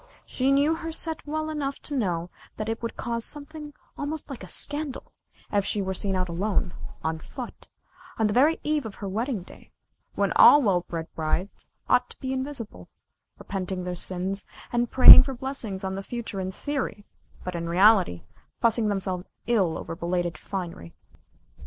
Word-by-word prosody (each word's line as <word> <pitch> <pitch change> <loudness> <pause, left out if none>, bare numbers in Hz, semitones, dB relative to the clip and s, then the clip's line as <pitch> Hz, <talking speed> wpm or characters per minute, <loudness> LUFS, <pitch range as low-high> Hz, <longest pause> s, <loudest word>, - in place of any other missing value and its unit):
She 265 +1 0
knew 285 +3 +4
her 325 0 -5
set 320 -1 -2
well 310 +1 -2
enough 280 -2 -3
to 290 - -3
know 180 -8 -1 0.3
that 215 - -4
it 225 0 -3
would 230 - -5
cause 235 -1 -2
something 295 +2 -2 0.2
almost 295 0 -4
like 270 - -7
a - - -8
scandal 290 - 0 0.4
if 205 -1 +2
she 205 - -1
were 190 -1 -1
seen 190 +1 0
out 185 0 0
alone, 185 +1 -1 0.3
on 160 0 -1
foot, 245 - -9 0.5
on 220 - +2
the 210 - +1
very 295 +7 +4
eve 300 -5 0
of 205 - -10
her 200 - -6
wedding 220 +1 -2
day, - - -16 0.5
when - - +1
all 290 - +9
well 195 -9 +2
bred 165 -2 -5
brides 165 +5 -3 0.2
ought 250 0 +3
to - - -14
be 260 0 -3
invisible 260 -4 -5 0.5
repenting 190 -2 -4
their 180 0 -3
sins, 185 +2 -3 0.3
and 240 0 +1
praying 260 - +11
for 265 0 -4
blessings 240 -7 -3
on 190 0 -2
the 195 - -4
future 225 -2 -5
in 185 0 -2
theory, 225 -2 -4 0.4
but 180 - -4
in 170 -1 -4
reality, 185 - +4 0.4
fussing 230 -1 +2
themselves 190 -3 -2 0.2
ill 195 -9 +1
over 165 - -6
belated 175 0 -2
finery. 170 - -6
210 Hz, 175 wpm, -26 LUFS, 185-270 Hz, 0.5 s, praying